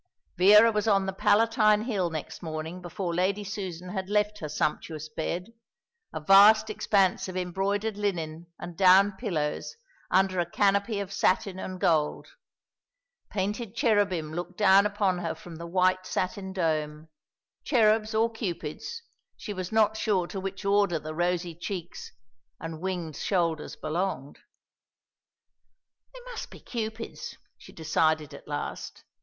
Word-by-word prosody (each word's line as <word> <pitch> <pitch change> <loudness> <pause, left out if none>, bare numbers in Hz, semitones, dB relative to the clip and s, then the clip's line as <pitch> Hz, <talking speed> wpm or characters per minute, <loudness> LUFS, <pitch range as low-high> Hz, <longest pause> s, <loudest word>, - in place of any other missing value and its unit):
Vera 210 +5 +7
was 210 0 -1
on 195 -2 +3
the 190 - -3
Palatine 215 +1 +3
Hill 200 -7 -1
next 155 -2 -6
morning 160 +2 -5
before 175 0 -4
Lady 190 +4 0
Susan 185 -3 -6
had 190 0 -4
left 210 0 +1
her 155 - -5
sumptuous 155 +1 -2
bed, 170 +6 -4 0.6
a - - -4
vast 210 +6 +6
expanse 195 -3 +1
of 185 0 -5
embroidered 200 +4 -1
linen 170 -5 -3
and 175 - -8
down 190 +3 +6
pillows, 185 - -3 0.3
under 190 -1 +2
a 170 -1 -1
canopy 200 +2 +1
of 200 -1 -5
satin 190 0 +1
and 185 -1 -6
gold. 155 -4 +1 1.0
Painted 210 +2 -3
cherubim 205 - +1
looked 175 +2 -5
down 200 0 +6
upon 200 -3 0
her 165 -2 -3
from 165 0 -11
the 170 +1 -7
white 185 +1 +1
satin 190 +1 -3
dome, 155 -4 -2 0.6
cherubs 220 -3 +2
or 225 +1 +4
cupids, 215 - -5 0.3
she 210 - -6
was 185 -2 -5
not 220 -1 +3
sure 205 -5 +1
to 195 +2 -6
which 195 +1 -6
order 200 -3 +3
the 155 0 -6
rosy 175 +1 -1
cheeks 175 +1 -6 0.5
and 165 -1 -7
winged 175 -5 -3
shoulders 165 -5 -1
belonged. 155 -3 -3 1.8
"They - - -10
must - - -7
be - - -12
cupids," 225 -1 -6 0.2
she - - -15
decided 155 -1 0
at - - -12
last. - - -5
190 Hz, 140 wpm, -27 LUFS, 170-210 Hz, 1.8 s, Vera